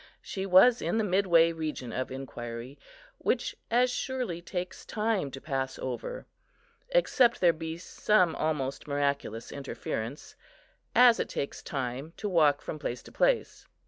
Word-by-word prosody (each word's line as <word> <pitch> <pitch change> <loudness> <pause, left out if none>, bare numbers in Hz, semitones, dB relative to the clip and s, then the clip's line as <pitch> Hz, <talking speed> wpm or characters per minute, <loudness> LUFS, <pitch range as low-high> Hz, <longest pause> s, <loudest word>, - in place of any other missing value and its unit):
She 190 0 -4
was 195 +7 +6
in - - 0
the 220 - +2
midway 180 -4 +4
region 155 -7 -4
of 130 - -2
inquiry, 125 -1 -7 0.4
which - - 0
as 245 +2 +3
surely 250 -10 -3
takes 180 +1 -5
time 210 -8 -1
to 135 - -8
pass 135 -2 -3
over, 125 -2 -5 0.6
except 265 - +3
there 175 -2 +5
be 160 0 -5
some 180 0 +2
almost 150 -3 -2
miraculous 140 -5 -1
interference, 135 -2 -5 0.6
as 245 -2 +7
it - - -1
takes 140 - -4
time 135 +3 -4
to 210 - -3
walk 155 -6 +3
from 155 - -5
place 125 -4 -4
to - - -13
place. - - +1
160 Hz, 145 wpm, -29 LUFS, 135-205 Hz, 0.6 s, as